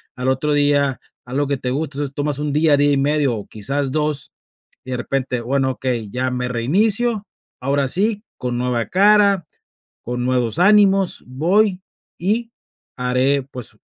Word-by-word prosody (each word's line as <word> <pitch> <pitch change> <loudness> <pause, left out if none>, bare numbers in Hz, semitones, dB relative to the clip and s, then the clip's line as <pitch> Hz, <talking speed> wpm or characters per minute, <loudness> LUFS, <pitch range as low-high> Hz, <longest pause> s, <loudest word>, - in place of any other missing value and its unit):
al 125 +1 -1
otro 140 +3 0
día 145 -2 +2 0.2
algo 135 +3 -1
que 140 -1 -1
te 125 0 -3
guste, 145 0 -3
entonces 145 -1 -3
tomas 145 -1 -1
un 150 -1 -2
día, 150 -1 +4
día 145 +1 +3
y - - +2
medio, 140 -3 +1
o 105 - -7
quizás 135 +6 -2
2, 150 -1 -1 0.5
y 130 - -7
de 125 - -1
repente, 125 0 -2
bueno, 130 +2 0
okey, 125 -5 -3
ya 130 0 -1
me 125 0 -2
reinicio, 205 - +1 0.3
ahora 140 +1 0
sí, 210 +6 0
con 125 -1 -3
nueva 125 -2 -1
cara, 200 -2 +4 0.6
con 125 +1 -3
nuevos 125 +1 0
ánimos, 195 -1 +4
voy 185 +9 +1 0.4
y 225 +6 -1 0.5
haré, 130 +2 +1
pues, 130 -3 -9
140 Hz, 160 wpm, -20 LUFS, 125-170 Hz, 0.6 s, día